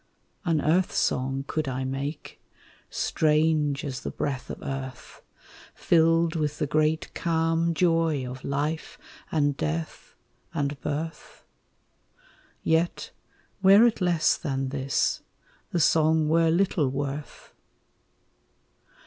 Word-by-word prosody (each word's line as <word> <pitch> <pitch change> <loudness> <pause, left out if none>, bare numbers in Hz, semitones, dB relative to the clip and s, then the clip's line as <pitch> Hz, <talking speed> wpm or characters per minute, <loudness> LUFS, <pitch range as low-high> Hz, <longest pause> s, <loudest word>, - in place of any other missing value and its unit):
An 165 -3 +2
earth 175 +4 +2
song 135 +1 0
could 155 -1 -2
I 130 0 -2
make, 135 +3 -5 0.5
strange 155 -1 +1
as 135 -3 -4
the - - -5
breath 135 -3 -4
of - - -5
earth, 130 -2 -7 0.5
Filled 165 0 +3
with 150 -2 -1
the - - 0
great 155 +2 0
calm 165 0 0
joy 165 -6 +1
of 130 +1 -8
life 150 +3 -3 0.3
and 145 -3 +1
death 80 - -4 0.4
and 140 -3 -2
birth? 155 +3 -5 1.2
Yet, 165 +2 0 0.5
were 200 +4 +7
it 225 -3 +1
less 175 -3 +2
than 135 -3 -2
this, 135 0 0 0.5
the 175 - -1
song 160 0 +3
were 165 +1 +3
little 170 -4 +2
worth. 140 +2 -5
155 Hz, 110 wpm, -26 LUFS, 140-165 Hz, 1.2 s, were